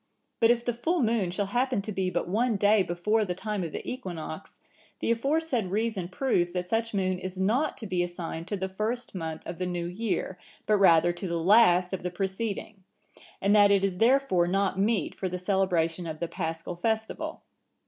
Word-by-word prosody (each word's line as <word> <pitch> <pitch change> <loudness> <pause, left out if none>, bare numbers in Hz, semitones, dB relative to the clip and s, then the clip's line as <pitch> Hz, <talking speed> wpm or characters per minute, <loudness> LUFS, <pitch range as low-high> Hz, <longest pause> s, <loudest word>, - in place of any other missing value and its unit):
But 225 - +5
if 240 0 +2
the 240 - 0
full 315 +7 0
moon 220 -5 +1
shall 195 +3 -1
happen 245 +3 0
to 215 - -5
be 190 -2 -1
but - - -2
one 225 +5 +1
day 205 +1 +4
before 190 +5 +1
the 180 -3 -3
time 210 0 -3
of 165 - -4
the - - -6
equinox, 180 -8 -6 0.4
the - - 0
aforesaid 275 -2 0
reason 205 -1 -1
proves 180 -4 0
that 180 -1 -2
such 225 0 -1
moon 185 -2 0
is 185 0 -6
not 230 +11 +1
to 225 - -7
be 185 -3 0
assigned 175 -1 -4
to 205 - -2
the 190 0 -2
first 215 +6 -3
month 160 -4 -5
of 170 - -6
the 180 - -1
new 175 -1 -3
year, 185 0 -3 0.3
but 215 - +3
rather 175 -2 +5
to 185 +2 -5
the 170 -1 -1
last 180 0 +5
of 190 - -2
the 180 - -2
preceding, 195 +2 -4 0.6
and 200 +2 +4
that 205 -1 +7
it 200 -1 +3
is 190 -2 -1
therefore 235 -8 +3
not 195 +1 0
meet 205 -4 +1
for 190 - -3
the 180 - -3
celebration 180 -3 0
of 155 -1 -5
the 170 - -2
Paschal 165 0 -4
festival. 220 +4 -2
190 Hz, 200 wpm, -28 LUFS, 175-225 Hz, 0.6 s, that